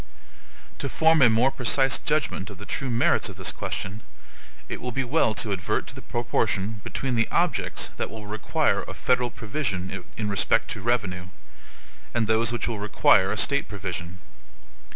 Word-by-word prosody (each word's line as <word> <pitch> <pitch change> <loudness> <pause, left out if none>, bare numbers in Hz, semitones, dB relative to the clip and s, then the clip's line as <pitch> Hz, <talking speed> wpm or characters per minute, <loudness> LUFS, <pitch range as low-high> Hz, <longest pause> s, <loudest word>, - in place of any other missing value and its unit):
To - - -2
form 160 -1 +4
a 125 - +8
more 115 +4 +4
precise 135 +2 +2
judgment 150 -10 -1
of 100 - -10
the 105 - -9
true 135 +4 -3
merits 120 0 +2
of - - -9
this - - -2
question, 95 +4 -4 0.7
it - - -5
will 125 - -3
be 135 +3 -1
well 125 -4 +2
to 100 +2 0
advert 90 -2 -1
to - - -10
the - - -9
proportion 110 -2 -1
between 135 -2 -3
the 115 -1 +2
objects - - 0
that - - -2
will 110 -1 -8
require 105 0 0
a - - -8
federal 125 -1 +1
provision 100 -6 -3
in 105 - -1
respect 100 -2 +2
to - - -4
revenue, 95 -7 -1 0.9
and 115 - +2
those 110 +1 +2
which 120 - -1
will 115 -3 -2
require 100 -2 +4
a 110 - -2
State 140 +5 +1
provision. 90 -4 -5
110 Hz, 175 wpm, -26 LUFS, 100-125 Hz, 0.9 s, a